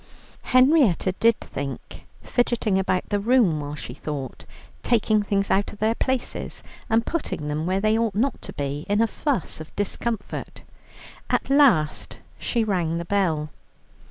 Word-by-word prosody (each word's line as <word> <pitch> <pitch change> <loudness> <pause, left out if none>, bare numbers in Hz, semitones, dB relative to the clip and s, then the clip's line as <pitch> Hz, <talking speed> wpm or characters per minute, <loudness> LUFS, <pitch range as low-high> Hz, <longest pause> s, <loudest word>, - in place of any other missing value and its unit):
Henrietta 255 - +4
did 230 -1 +4
think, 135 -1 -7 0.2
fidgeting 235 -5 +1
about 185 -1 0
the 205 - +1
room 210 -7 +3
while 145 0 -5
she - - -7
thought, 140 -4 -6 0.4
taking 215 -2 +2
things 200 -1 0
out 200 +1 +2
of - - -12
their 220 +2 +2
places 260 +1 -3 0.3
and 225 +1 +2
putting 220 - -3
them 155 +3 -2
where 190 +1 +1
they 215 +2 +2
ought 225 -3 0
not 260 +6 0
to - - -7
be, 145 +1 -3
in 205 +1 +2
a 230 - +5
fuss 235 - -2
of 155 - -11
discomfort. 205 +2 -4 0.7
At - - 0
last 245 - +3 0.2
she 235 -2 0
rang 175 -6 0
the 170 - -4
bell. 165 -6 0
205 Hz, 155 wpm, -24 LUFS, 160-230 Hz, 0.7 s, a